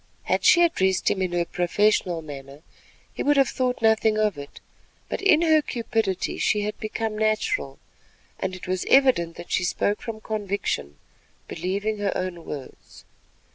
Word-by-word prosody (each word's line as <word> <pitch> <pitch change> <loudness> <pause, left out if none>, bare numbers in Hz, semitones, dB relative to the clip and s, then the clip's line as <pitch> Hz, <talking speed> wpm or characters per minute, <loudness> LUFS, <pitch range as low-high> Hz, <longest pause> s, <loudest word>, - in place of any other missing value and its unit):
Had - - 0
she 345 - +6
addressed 190 - +2
him 190 - -1
in 185 -1 -1
her 175 -1 +1
professional 180 -1 +1
manner, 140 0 -10 0.5
he - - -5
would 290 0 +3
have 275 -2 +4
thought 250 -2 -2
nothing 220 -1 +3
of 215 -2 +1
it; 140 0 -10 0.5
but - - -3
in 340 -5 +4
her 315 -2 +5
cupidity 225 -7 -2
she 210 - +2
had 210 +1 -3
become 220 0 -3
natural, 215 - -1 0.6
and 190 -1 -3
it 185 - -10
was 185 0 -1
evident 250 -12 +4
that 175 - -10
she - - +1
spoke 200 +4 0
from 230 -3 -6
conviction, 200 - -3 0.5
believing 200 +5 -2
her 200 -1 -1
own 180 -2 -4
words. 140 -3 -9
205 Hz, 160 wpm, -24 LUFS, 175-225 Hz, 0.6 s, she